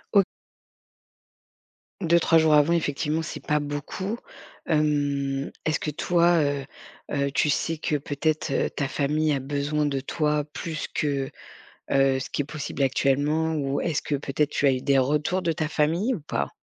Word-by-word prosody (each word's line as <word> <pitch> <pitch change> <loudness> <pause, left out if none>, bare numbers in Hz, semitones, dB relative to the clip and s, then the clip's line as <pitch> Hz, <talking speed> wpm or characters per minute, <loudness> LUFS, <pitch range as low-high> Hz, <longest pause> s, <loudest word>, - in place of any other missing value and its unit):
O 200 - +8 1.8
2-3 170 -1 +4
jours 160 -1 +4
avant 150 +3 +5
effectivement, 155 0 0
c'est 160 - -7
pas 150 0 +2
beaucoup, 145 +9 -4 0.5
hem, 145 -3 0
est-ce 155 - +1
que 150 - -2
toi, 170 +2 +3
heu 140 -2 -1 0.5
heu, 140 0 0
tu 150 +2 +2
sais 160 +2 0
que 150 - -1
peut-être, 150 +1 -1
heu, - - +1
ta 140 - -2
famille 150 +2 +1
a 140 - 0
besoin 145 +2 -1
de 140 -2 0
toi 150 +2 0
plus 160 -4 -4
que, 140 -3 -1 0.6
heu, 135 -1 +3
ce - - -6
qui 145 - 0
est - - -8
possible 145 -1 -4
actuellement 145 +4 +2
ou 140 -2 -1
est-ce 160 -4 -1
que 145 - -2
peut-être, 140 +1 -1
tu 145 - +1
as 135 - +5
eu 130 -1 -2
des 140 -1 +3
retours 150 +7 +1
de 165 -1 +1
ta 155 -1 -2
famille 170 +12 +1
ou 175 - -5
pas? 70 - -2
150 Hz, 170 wpm, -25 LUFS, 140-160 Hz, 1.8 s, O